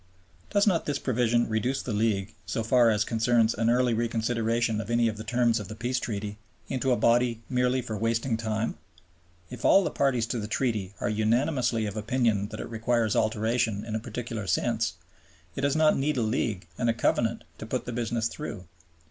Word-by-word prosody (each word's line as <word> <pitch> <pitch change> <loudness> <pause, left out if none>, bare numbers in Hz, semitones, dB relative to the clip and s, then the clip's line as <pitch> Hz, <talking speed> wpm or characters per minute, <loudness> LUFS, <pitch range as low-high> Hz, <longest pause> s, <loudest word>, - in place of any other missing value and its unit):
Does 205 -1 +3
not 180 -6 +1
this 145 -2 0
provision 120 -2 +1
reduce 120 +4 -1
the 120 - -3
League, 105 -1 0
so 115 - -2
far 120 +1 +4
as 105 -1 +2
concerns 115 0 +2
an 115 +1 +1
early 125 0 +3
reconsideration 115 0 0
of 110 - -9
any 120 0 +3
of 110 - -2
the 110 - -7
terms 120 0 +2
of 105 - -7
the 110 - -7
Peace 125 +3 -1
Treaty, 105 -2 -4 0.3
into 130 0 0
a 125 - +3
body 120 -1 +2
merely 125 0 +1
for 110 -2 -4
wasting 115 +3 0
time? 110 0 -2 0.7
If 125 -2 -8
all 195 - +6
the - - -1
parties 130 -5 +1
to 120 - -2
the 105 - -4
Treaty 105 -5 -1
are - - -1
unanimously 115 +2 +1
of 100 -1 -4
opinion 110 -2 +1
that - - -8
it - - -5
requires 115 -1 +1
alteration 110 0 0
in 110 - -5
a 110 - 0
particular 115 -2 -5
sense, 115 -3 0 0.6
it - - -3
does 140 +1 +1
not 155 -1 +4
need 145 +1 0
a 120 - +1
League 110 -5 -1
and 120 - +1
a - - +3
Covenant 115 0 +1 0.2
to 110 - -7
put 125 +1 -2
the 125 - -5
business 115 -1 -1
through. 115 -10 -7
115 Hz, 200 wpm, -27 LUFS, 110-125 Hz, 0.7 s, all